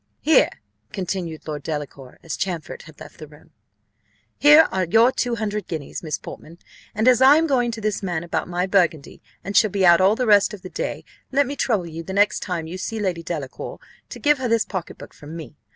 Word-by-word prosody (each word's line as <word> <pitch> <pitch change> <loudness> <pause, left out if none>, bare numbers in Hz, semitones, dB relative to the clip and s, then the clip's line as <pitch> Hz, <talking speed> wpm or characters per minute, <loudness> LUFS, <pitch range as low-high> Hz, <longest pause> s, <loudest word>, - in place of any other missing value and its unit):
"Here," 310 -2 +4 0.4
continued 180 -5 -5
Lord 150 -2 -4
Delacour, 145 -4 -6
as 165 - -4
Champfort 175 -5 -4
had 155 - -16
left - - -13
the 155 - -9
room, 150 +1 -19 0.8
"here 295 +2 +7
are 190 - 0
your 225 +8 +4
two 245 -2 -1
hundred 210 -3 -3
guineas, 160 -5 -6
Miss 155 -3 -3
Portman; 165 +2 -11 0.4
and 220 +3 +1
as 255 -1 +5
I 270 +2 +8
am 325 - +2
going 255 -5 +1
to 225 -1 -6
this 215 -1 -2
man 175 -4 -3
about 170 - -3
my 180 +1 -1
burgundy, 175 -6 0 0.2
and 200 - -6
shall 215 - +5
be 195 -1 +1
out 175 0 +6
all 195 +3 +4
the 250 - -1
rest 205 -1 +4
of 195 - -17
the 185 - -9
day, - - -4 0.3
let 280 +1 +3
me 280 +2 -5
trouble 215 -9 0
you 165 0 -7
the 190 +3 -7
next 205 +1 +2
time 175 -3 -4
you 175 +3 -7
see 225 +3 -4
Lady 185 -5 -2
Delacour 155 -6 -6 0.3
to - - -8
give 295 -2 +3
her 255 - -1
this 230 -2 +2
pocket 185 -4 -6
book - - -12
from 150 +2 -11
me. 155 -2 -10
190 Hz, 220 wpm, -22 LUFS, 165-225 Hz, 0.8 s, I